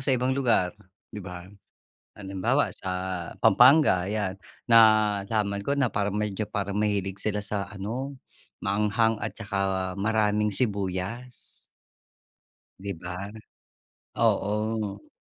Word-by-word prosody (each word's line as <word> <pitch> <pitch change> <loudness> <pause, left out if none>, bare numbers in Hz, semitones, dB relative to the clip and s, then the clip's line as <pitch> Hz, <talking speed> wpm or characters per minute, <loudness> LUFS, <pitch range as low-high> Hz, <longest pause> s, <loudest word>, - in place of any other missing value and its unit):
sa 130 -2 +3
ibang 125 +2 0
lugar, 120 -9 +2 0.4
'di 105 - -6
ba? 90 -1 -8 0.7
Halimbawa 105 +8 0
sa 95 - -6 0.5
Pampanga, 120 - +6
ayan, 100 -2 -2 0.2
nalaman 105 -2 +4
ko 140 +6 -1
na 130 -4 +1
parang 100 0 -1
medyo 105 0 -2
parang 100 +1 -2
mahilig 100 -2 -1
sila 105 -1 -1
sa 100 -1 -3
ano, 120 +8 -5 0.5
maanghang 105 +2 +1
at - - -4
tsaka 95 -3 -2
maraming 105 0 +2
sibuyas. 100 +2 -3 1.2
'Di 100 - -3
ba, 90 +3 -6 0.8
oo. 105 -1 0
105 Hz, 105 wpm, -26 LUFS, 100-110 Hz, 1.2 s, Pampanga